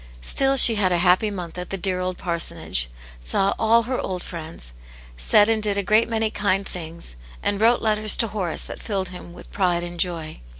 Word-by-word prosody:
Still 270 - +2
she 230 -3 +7
had 185 -2 +2
a 175 - +2
happy 180 +4 +3
month 180 -3 -7
at 180 - -7
the 195 - -4
dear 185 0 -1
old 185 0 -3
parsonage, 165 - -2 0.3
saw 195 - 0
all 230 +1 +3
her 255 +2 -3
old 180 -2 -5
friends, 160 - -4 0.4
said - - +3
and 225 -1 +1
did 205 -1 0
a 200 - 0
great 215 +4 +2
many 220 -1 -1
kind 200 -2 -1
things, 165 - -5 0.3
and 205 0 -1
wrote 235 +2 +3
letters 215 -1 +5
to 230 - +1
Horace 185 -6 -4
that - - -9
filled 195 -4 -3
him. 180 -1 -11
with - - -14
pride 175 -3 0
and 175 0 -8
joy. 165 - -3
185 Hz, 205 wpm, -22 LUFS, 175-215 Hz, 0.4 s, she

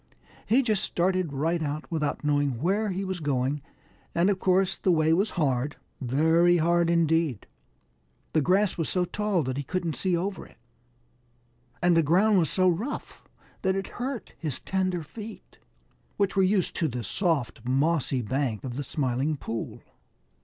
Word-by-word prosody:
He 255 +5 +4
just 215 -5 +1
started 185 -2 0
right 160 +5 0
out 150 0 -3
without 150 -3 -1
knowing 145 -4 +1
where 200 - +1
he 190 +1 -2
was 190 -1 -3
going, 140 -1 -1 0.5
and 175 +4 +3
of 190 - -2
course 185 0 +2
the - - -1
way 160 -1 +3
was 195 +5 +2
hard, 140 -2 0 0.3
very 160 +7 +4
hard 170 +1 +2
indeed. 165 -6 +1 0.9
The 155 - +3
grass 185 +5 +2
was 165 - -1
so 180 -1 +1
tall 205 -2 0
that 130 0 -3
he 140 - -2
couldn't 170 +2 -2
see 185 -2 0
over 190 +3 -3
it, - - -21 1.3
and 175 -1 +5
the 165 - +5
ground 190 +7 +4
was 160 -5 +2
so 185 -1 +2
rough 205 - -2 0.4
that 190 0 +1
it 195 0 -3
hurt 260 -2 -4
his 150 -6 -3
tender 185 -3 -1
feet, 215 +8 -10 0.6
which 200 -1 +1
were 195 - +4
used 190 -1 +2
to 165 - +1
the 125 -3 -4
soft, 145 - -1
mossy 135 0 +1
bank 125 -1 -1
of 125 -1 -5
the 145 - -2
Smiling 135 +2 -1
Pool. 115 -3 -5
165 Hz, 165 wpm, -27 LUFS, 145-185 Hz, 1.3 s, and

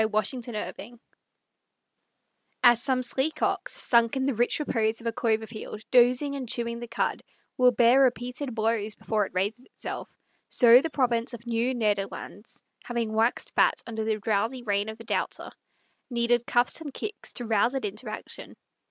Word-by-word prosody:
WILHELMUS 220 +3 -1
KIEFT 235 +1 -6 1.6
As 240 -1 +6
some 255 -1 +1
sleek 270 +5 0
ox, - - -1
sunk 235 +1 +2
in 265 - 0
the 275 - +1
rich 240 +5 +1
repose 225 -6 0
of 235 - -12
a 230 - +1
clover 220 -1 0
field, 215 -1 -8
dozing 250 +3 +4
and 260 -4 -5
chewing 235 0 -2
the 240 - -7
cud, 230 - -1 0.3
will 250 0 +5
bear 245 +2 +5
repeated 250 0 0
blows 220 -1 0
before 210 -3 -1
it - - -17
raises 205 +7 -1
itself, - - -7 0.4
so 240 +1 +7
the 325 - -2
province 245 -4 0
of 235 - -12
Nieuw 240 +2 0
Nederlandts, 210 +1 -3 0.2
having 235 -3 -2
waxed 225 +2 0
fat - - +3
under 220 -2 -4
the 220 0 0
drowsy 225 +4 -1
reign 205 -1 0
of 220 - -7
the 230 - -11
Doubter, - - -2 0.6
needed 240 -1 +1
cuffs 245 +6 +2
and 295 -3 -6
kicks 420 +9 -6
to 245 - -6
rouse 225 +3 +2
it 265 - -2
into 215 +3 -5
action. - - -9
235 Hz, 170 wpm, -27 LUFS, 220-250 Hz, 1.6 s, so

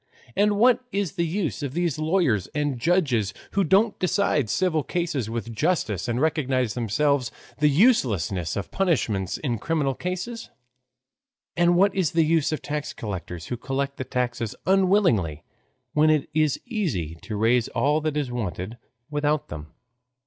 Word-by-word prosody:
And 205 +1 +3
what 245 +3 +4
is 195 -5 -1
the 170 -1 -1
use 160 - -2
of 140 0 -4
these 170 -4 0
lawyers 155 - +1
and 145 -4 -1
judges 130 - +1 0.2
who 200 - +2
don't 200 +6 +3
decide 180 - +1
civil 175 - +1
cases 150 - -2
with 115 0 -4
justice 115 - 0
and 120 0 -1
recognize 135 -7 +1
themselves 125 +3 +1 0.3
the 150 0 +4
uselessness 115 - +2
of 100 - -4
punishments 110 - 0
in 120 -7 -2
criminal 150 -2 0
cases? 185 - -5 1.1
And 175 0 +4
what 195 +2 +4
is 185 -5 0
the 165 -1 +4
use 160 -1 +2
of 155 - -3
tax 145 -5 -3
collectors 90 -6 -6
who 125 - -2
collect 140 +2 -3
the - - -3
taxes 120 -3 -2
unwillingly, 185 - +2 0.5
when 155 +1 +4
it 155 -2 +2
is 155 -2 +2
easy 160 - -2
to 110 - -6
raise 115 +3 +2
all 150 +2 +1
that 155 -1 -1
is 140 -4 -1
wanted 110 -1 -4 0.3
without 150 0 0
them? 75 0 -7
145 Hz, 155 wpm, -25 LUFS, 115-175 Hz, 1.1 s, what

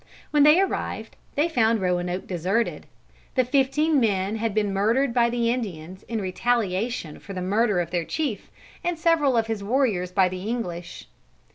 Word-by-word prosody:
When 295 - +4
they 300 +4 +7
arrived, 390 - -2 0.2
they 300 +3 +2
found 230 -8 +2
Roanoke 180 0 -1
deserted. 190 +6 -1 0.5
The 255 -2 +3
fifteen 280 +4 +2
men 205 -2 0
had 220 -1 -2
been 205 -2 +1
murdered 230 +6 +2
by 235 -1 +3
the 235 -1 +1
Indians 185 -7 -5
in 230 -1 -2
retaliation 200 -2 -1
for 195 - -9
the 185 - -4
murder 205 +1 +2
of 170 -1 -2
their 175 -2 0
chief 275 - -3 0.3
and 350 -1 -1
several 310 -6 +3
of 225 - +2
his 220 -2 -3
warriors 210 -6 +1
by 190 0 +4
the 185 0 -5
English. 175 -7 -5
225 Hz, 165 wpm, -25 LUFS, 185-255 Hz, 0.5 s, they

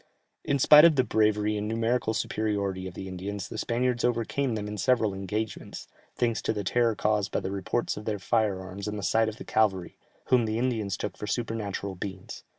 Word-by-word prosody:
In 140 - +1
spite 150 +3 +8
of 170 -2 +7
the 130 - +4
bravery 105 -2 +1
and 105 0 -3
numerical 115 0 0
superiority 100 -4 -1
of 90 - -9
the 95 - -6
Indians, 95 +1 -5
the - - -5
Spaniards 120 0 0
overcame 120 +2 0
them 105 -1 -4
in 105 0 -5
several 110 0 +2
engagements, 100 +2 -5 0.3
thanks 115 -3 0
to - - 0
the 105 -2 -3
terror 115 +4 +2
caused 105 -1 0
by - - 0
the 95 - -4
reports 100 +5 -2
of 105 - -7
their 110 -2 -1
fire 105 -1 +1
arms 95 +2 -7
and 105 0 -3
the 100 - -5
sight 110 +5 +2
of 110 - -9
the - - -9
cavalry, 95 -5 0 0.3
whom 125 -3 +4
the 110 0 -1
Indians 110 -6 -1
took 100 -2 -5
for 105 - -6
supernatural 105 -4 -3
beings. 95 0 -7
105 Hz, 205 wpm, -27 LUFS, 100-115 Hz, 0.3 s, spite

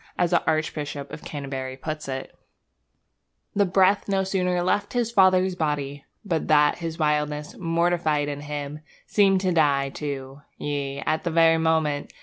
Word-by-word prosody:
As 175 -1 +1
the 175 - +3
Archbishop 150 -3 -2
of 155 - -8
Canterbury 135 -3 -5
puts 155 +1 -5
it: 135 -1 -5 1.2
The 200 -1 +2
breath 190 +2 +3
no 195 -1 +2
sooner 180 -2 0
left 205 +3 0
his 240 -2 0
father's 185 -3 +4
body 145 -4 -3 0.2
But 165 -5 -1
that 150 0 +4
his 165 -1 -4
wildness, 150 -1 -1
mortified 165 -3 +1
in 145 0 -4
him, 145 0 -5 0.3
Seemed 195 -2 +3
to 185 -1 +1
die, 140 -4 +2
too. 135 -1 -6 0.2
Yea, 140 -1 -3
at 155 0 0
that 175 - -1
very 165 0 +4
moment. 160 -3 0
155 Hz, 150 wpm, -25 LUFS, 145-180 Hz, 1.2 s, father's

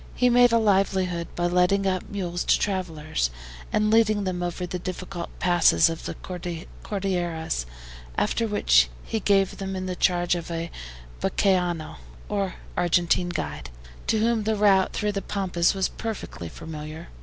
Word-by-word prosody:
He 250 0 +4
made 245 0 +6
a 230 - +5
livelihood 190 -5 +1
by 175 - 0
letting 180 +3 +3
out 185 -2 -1
mules 175 -3 -3
to - - +4
travelers, 160 - -1 0.4
and 215 0 +2
leading 215 -2 +4
them 185 -2 -2
over 175 +1 -2
the 180 +1 -4
difficult 180 -1 -5
passes 175 - +4
of 165 - -7
the - - -4 0.7
Cordilleras, 175 - -2 0.5
after 230 - +1
which 60 - +4
he 225 - -2
gave 195 -2 +2
them 195 -1 -4
in 185 -1 -3
charge 175 -1 +2
of 175 -1 -4
a 165 0 -3 0.5
BAQUEANO, 180 - 0 0.3
or 195 -2 -1 0.2
Argentine 175 0 +2
guide, 175 - -4 0.4
to - - +2
whom 225 +1 +2
the 220 +1 0
route 200 -2 +4
through 210 0 -1
the 200 -1 -3
Pampas 185 -3 0
was 190 -1 +1
perfectly 215 - -6
familiar. 155 - -8
185 Hz, 150 wpm, -25 LUFS, 170-200 Hz, 0.7 s, made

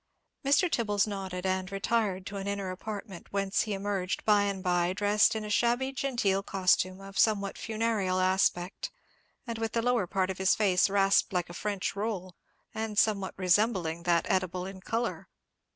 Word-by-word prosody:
Mr. 285 +6 +4
Tibbles 210 - +1
nodded, 190 -3 -5
and 185 0 -1
retired 195 -2 0
to 200 - -6
an 195 0 -5
inner 200 -2 -2
apartment, 200 -1 -7
whence 195 0 0
he 215 - -2
emerged 195 -2 -2
by 205 -1 +4
and 195 -2 -3
by 180 -1 +1
dressed 205 +2 +3
in 215 -1 -3
a - - -6
shabby 240 +5 +2
genteel 240 -8 0
costume 185 -1 +1
of 195 0 -7
somewhat 200 -3 +2
funereal 215 -4 -1
aspect, 185 0 +1 0.6
and 230 -2 -5
with 225 0 -2
the 230 - +1
lower 245 -6 +1
part 190 +1 0
of 190 - -8
his 190 0 +4
face 195 -3 +3
rasped 195 0 +3
like 175 -1 -1
a - - -9
French 200 0 -3
roll, 200 -4 -3 0.4
and 220 -1 -4
somewhat 200 -3 +2
resembling 185 -3 +1
that 170 -1 +2
edible 185 -1 0
in 190 0 -8
colour. 230 +4 -2
195 Hz, 170 wpm, -29 LUFS, 185-215 Hz, 0.6 s, Mr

